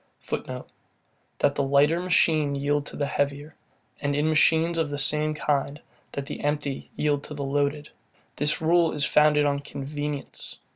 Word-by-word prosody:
[Footnote: -, -, -5 dB, 0.7 s
That 140 Hz, -, +3 dB
the 140 Hz, -, -1 dB
lighter 140 Hz, +4 st, +3 dB
machine 160 Hz, -5 st, +2 dB
yield 145 Hz, +1 st, 0 dB
to -, -, -8 dB
the 145 Hz, -, -1 dB
heavier, 145 Hz, +2 st, -2 dB, 0.5 s
and, 145 Hz, -1 st, 0 dB
in 150 Hz, +2 st, +1 dB
machines 160 Hz, +2 st, +3 dB
of 160 Hz, -2 st, 0 dB
the 145 Hz, -, -3 dB
same 150 Hz, +2 st, +1 dB
kind, 145 Hz, -1 st, -1 dB, 0.3 s
that 140 Hz, -, -4 dB
the -, -, -6 dB
empty 145 Hz, -2 st, -2 dB
yield 145 Hz, -2 st, 0 dB
to 150 Hz, -, -8 dB
the 140 Hz, -, -4 dB
loaded; 145 Hz, +2 st, -1 dB, 0.5 s
this 150 Hz, +2 st, +1 dB
rule 165 Hz, +1 st, +3 dB
is 150 Hz, -1 st, 0 dB
founded 150 Hz, -1 st, +4 dB
on 140 Hz, -1 st, +1 dB
convenience. 145 Hz, +1 st, -6 dB
145 Hz, 160 wpm, -26 LUFS, 140-155 Hz, 0.7 s, founded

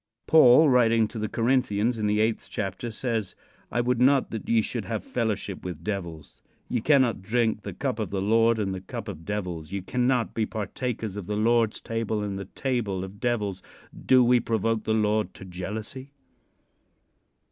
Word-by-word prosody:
Paul, 155 Hz, 0 st, +7 dB
writing 115 Hz, -4 st, +4 dB
to 115 Hz, -, -6 dB
the 110 Hz, -, -2 dB
Corinthians, 115 Hz, -2 st, +1 dB
in 105 Hz, -, 0 dB
the 105 Hz, +1 st, +2 dB
eighth 110 Hz, 0 st, 0 dB
chapter 100 Hz, +3 st, -4 dB
says; 110 Hz, -3 st, -3 dB, 0.4 s
"I 120 Hz, -, +1 dB
would 125 Hz, 0 st, 0 dB
not 135 Hz, +1 st, +4 dB
that 110 Hz, -, -6 dB
ye 115 Hz, -1 st, +3 dB
should 115 Hz, -2 st, -4 dB
have 110 Hz, -2 st, -3 dB
fellowship 110 Hz, -5 st, -3 dB
with 90 Hz, -1 st, -6 dB
devils. 85 Hz, -7 st, -6 dB, 0.3 s
Ye 120 Hz, -, -1 dB
cannot 130 Hz, -6 st, +3 dB
drink 115 Hz, +2 st, 0 dB
the -, -, -6 dB
cup -, -, -2 dB
of -, -, -2 dB
the 100 Hz, -, -2 dB
Lord 115 Hz, +3 st, +3 dB
and 100 Hz, -3 st, -1 dB
the 95 Hz, -, -5 dB
cup 100 Hz, -, -7 dB
of 85 Hz, -5 st, -7 dB
devils. 90 Hz, -6 st, -4 dB
Ye 100 Hz, 0 st, -3 dB
cannot 125 Hz, +4 st, 0 dB
be 110 Hz, -2 st, -1 dB
partakers 110 Hz, -1 st, -4 dB
of 100 Hz, -4 st, -6 dB
the 105 Hz, -, -2 dB
Lord's 115 Hz, 0 st, +2 dB
table 115 Hz, -2 st, -2 dB
and 100 Hz, -1 st, -3 dB
the 100 Hz, -, -5 dB
table 105 Hz, -4 st, -2 dB
of 95 Hz, +1 st, -9 dB
devils. 105 Hz, -6 st, -1 dB, 0.3 s
Do 130 Hz, -1 st, +4 dB
we 120 Hz, 0 st, +4 dB
provoke 115 Hz, -1 st, -1 dB
the 110 Hz, -, +1 dB
Lord 105 Hz, 0 st, 0 dB
to 95 Hz, -, -10 dB
jealousy?" 110 Hz, +9 st, -7 dB
110 Hz, 180 wpm, -26 LUFS, 100-120 Hz, 0.4 s, Paul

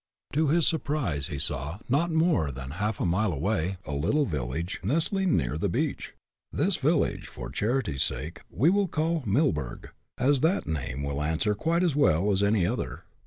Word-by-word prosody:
To 155 Hz, +1 st, +2 dB
his 165 Hz, +2 st, +3 dB
surprise 140 Hz, -, -1 dB
he 75 Hz, -, -5 dB
saw, 70 Hz, +3 st, -3 dB
not 145 Hz, +7 st, +2 dB
more 160 Hz, -, +2 dB
than 65 Hz, 0 st, -7 dB
a 90 Hz, +7 st, -7 dB
half 105 Hz, 0 st, -1 dB
mile 95 Hz, +4 st, +1 dB
away, 90 Hz, +3 st, -1 dB
a 75 Hz, -, -5 dB
little 85 Hz, -, +1 dB
village, 75 Hz, -, -3 dB
nestling 165 Hz, -, +2 dB
near 70 Hz, +5 st, -1 dB
the -, -, 0 dB
beach. -, -, -2 dB, 0.4 s
This -, -, +1 dB
village, -, -, +1 dB
for -, -, -8 dB
charity's 110 Hz, -, 0 dB
sake, 80 Hz, +3 st, -2 dB
we 140 Hz, -, +3 dB
will 200 Hz, 0 st, +2 dB
call 160 Hz, 0 st, 0 dB
Millburg, 95 Hz, -, 0 dB, 0.3 s
as 135 Hz, +2 st, +3 dB
that 170 Hz, +5 st, +2 dB
name 70 Hz, -3 st, -3 dB
will 70 Hz, +1 st, -2 dB
answer 80 Hz, +8 st, +1 dB
quite 165 Hz, -, +1 dB
us 165 Hz, -6 st, +2 dB
well 100 Hz, -, +3 dB
as 95 Hz, 0 st, +2 dB
any 100 Hz, -3 st, +3 dB
other. -, -, -3 dB
100 Hz, 175 wpm, -27 LUFS, -, 0.4 s, his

